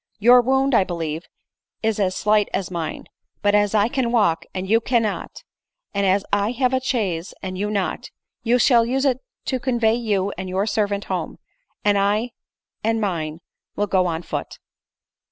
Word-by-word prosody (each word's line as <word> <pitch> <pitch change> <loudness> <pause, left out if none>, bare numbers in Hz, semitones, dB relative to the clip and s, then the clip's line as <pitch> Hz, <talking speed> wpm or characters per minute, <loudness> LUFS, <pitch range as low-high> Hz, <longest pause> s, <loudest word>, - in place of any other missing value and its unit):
You* 245 +4 +7
wound, 265 +2 +2
I 200 - +5
believe, 165 -2 -4 0.6
is 220 -1 0
as 185 -2 +1
slight 210 0 +2
as 190 -2 -3
mine; 170 -3 -4 0.4
but 205 0 +3
as 205 0 +3
I 210 0 +4
can 245 -2 -1
walk, 205 -9 +2
and 185 0 -4
you 225 +3 +3
cannot, 230 -3 -1 0.5
and 200 -1 +1
as 195 +1 +2
I 205 +3 +2
have 250 0 +1
a 260 - +2
chaise, 200 -10 -2
and 185 -1 -4
you 205 +3 -2
not, 200 -3 -2 0.3
you 240 +1 +3
shall 240 -2 +5
use 265 +4 0
it 260 -2 +2 0.3
to 260 - -1
convey 235 -3 +1
vou 205 -4 0
and 185 0 -4
your 190 +2 0
ser 215 -1 +1
vant 200 0 -3
home, - - -4 0.5
and 205 -1 +4
I 210 +4 +1 0.5
and 225 +1 +1
mine 165 -6 -2 0.3
will 205 - +1
go 185 -3 +2
on 165 0 -3
foot." - - -5
210 Hz, 180 wpm, -22 LUFS, 190-235 Hz, 0.6 s, You